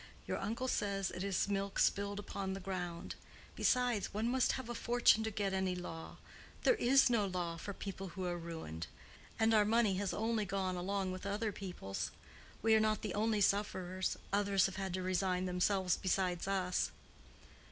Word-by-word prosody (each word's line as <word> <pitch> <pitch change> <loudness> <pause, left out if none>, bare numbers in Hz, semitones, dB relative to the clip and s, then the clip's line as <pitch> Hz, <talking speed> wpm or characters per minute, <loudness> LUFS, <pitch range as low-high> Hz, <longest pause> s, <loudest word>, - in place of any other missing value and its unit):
Your - - -2
uncle 230 +6 -2
says 200 -5 0
it 180 - -4
is 200 -1 +1
milk 200 0 -1
spilled 200 0 +2
upon 195 -1 -4
the 195 - -4
ground. 180 -3 -4 0.4
Besides, 245 -5 +2
one 215 +3 -1
must 260 0 +3
have 260 -3 -4
a 240 - -3
fortune 235 -2 +4
to 220 - -1
get 200 -2 -1
any 190 -1 0
law: 165 -2 -7 0.5
there - - +6
is 270 - +5
no 230 -5 +2
law 175 -3 -2
for 165 +5 -6
people 195 -1 -6
who 185 +1 -5
are 175 -1 -1
ruined. 160 - -6 0.5
And 225 0 +3
our 215 -1 +6
money 215 -2 +3
has 200 0 -1
only 225 0 0
gone 190 -1 -1
along 190 +1 -1
with 185 +2 -5
other 210 +2 -1
people's. 180 - -4 0.5
We 225 0 +5
are 220 - +6
not 215 0 +1
the 210 -4 -2
only 215 0 +1
sufferers: 190 -2 0 0.2
others 200 -2 +3
have 195 0 -2
to 185 0 -2
resign 185 0 +1
themselves 185 0 +1
besides 185 -1 0
us." 185 -2 +1
195 Hz, 175 wpm, -35 LUFS, 185-215 Hz, 0.5 s, there